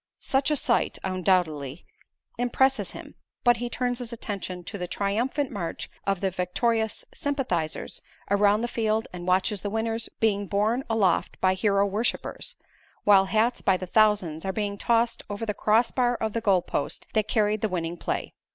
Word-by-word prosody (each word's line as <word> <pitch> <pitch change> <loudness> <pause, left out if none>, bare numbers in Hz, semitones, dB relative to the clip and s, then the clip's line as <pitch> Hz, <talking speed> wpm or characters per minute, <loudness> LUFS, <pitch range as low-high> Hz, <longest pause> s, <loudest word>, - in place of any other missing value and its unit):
Such 270 +1 +1
a 300 - +2
sight, 245 -3 +1
undoubtedly, 180 -6 0 0.5
impresses 265 +2 +2
him; - - -9 0.3
but 240 -1 +5
he 240 +1 -3
turns 245 0 -1
his 245 -1 -6
attention 195 -5 -5
to 200 +3 -7
the 180 - -3
triumphant 235 +10 -1
march 185 -7 -4 0.2
of 195 -2 +1
the 190 -1 +1
victorious 220 +5 0
sympathizers 245 - -2 0.3
around 205 +1 +4
the 240 - 0
field 220 -1 0
and 175 0 -7
watches 185 +3 +2
the 205 - -3
winners 225 +1 -2
being 205 -2 +1
borne 215 +7 +1
aloft 220 -4 +1
by 185 0 +3
hero 200 +1 +2
worshipers; 210 +4 -2 0.5
while 195 -2 +6
hats 220 +5 +1
by 190 -2 +3
the 185 - -5
thousands 195 -6 +2
are 190 - -1
being 205 0 -2
tossed 230 +2 +1
over 205 +2 -3
the 210 - -1
cross 220 +3 +3
bar 245 -1 +2
of 220 -2 -2
the 230 - -1
goal 195 -5 +3
post 140 - -3
that 215 -1 +1
carried 215 -2 +1
the 220 - +1
winning 170 -2 -2
play. - - -3
210 Hz, 170 wpm, -26 LUFS, 190-230 Hz, 0.5 s, while